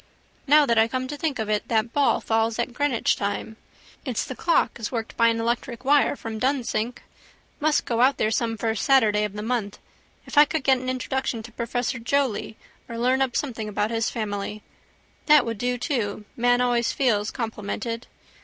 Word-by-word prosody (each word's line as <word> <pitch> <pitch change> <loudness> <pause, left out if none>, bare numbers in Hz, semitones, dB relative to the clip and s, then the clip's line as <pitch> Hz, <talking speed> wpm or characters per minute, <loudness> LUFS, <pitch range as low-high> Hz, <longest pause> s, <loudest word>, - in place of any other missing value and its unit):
Now 295 +1 +6
that 235 -4 +3
I 220 - +5
come 255 +2 -3
to 295 - -4
think 290 -2 -2
of 220 -2 -2
it 210 -1 -1
that 225 +1 0
ball 285 -1 +3
falls 225 0 0
at 240 +1 -2
Greenwich 285 -3 +1
time. 205 +2 -3 0.5
It's 255 -6 -2
the 260 - -6
clock 335 -4 +1
is 220 - -4
worked 230 -3 -4
by 230 - +4
an 230 0 +1
electric 235 +2 -2
wire 290 +1 +4
from 225 -4 -6
Dunsink. 250 -3 -1 0.6
Must 300 0 +2
go 235 -1 0
out 265 +2 +4
there 215 - +1
some 225 0 0
first 220 0 -1
Saturday 215 -6 +4
of 205 - -5
the 210 0 -5
month. 225 -3 -2 0.5
If 290 - +2
I 295 - +9
could 310 -1 -3
get 265 -1 +4
an 255 0 -4
introduction 255 -2 -2
to 235 - -11
professor 235 +1 -2
Joly 250 -3 -1 0.3
or 230 - -5
learn 255 +3 +2
up 260 -3 0
something 230 -7 -2
about 210 +1 -1
his 225 0 0
family. 210 -1 -4 0.6
That 300 -3 +6
would 230 -3 -4
do 245 +1 0
to: 225 -6 -2
man 245 +1 +3
always 240 -1 +1
feels 215 -6 +1
complimented. 230 +1 -4
235 Hz, 190 wpm, -24 LUFS, 220-260 Hz, 0.6 s, I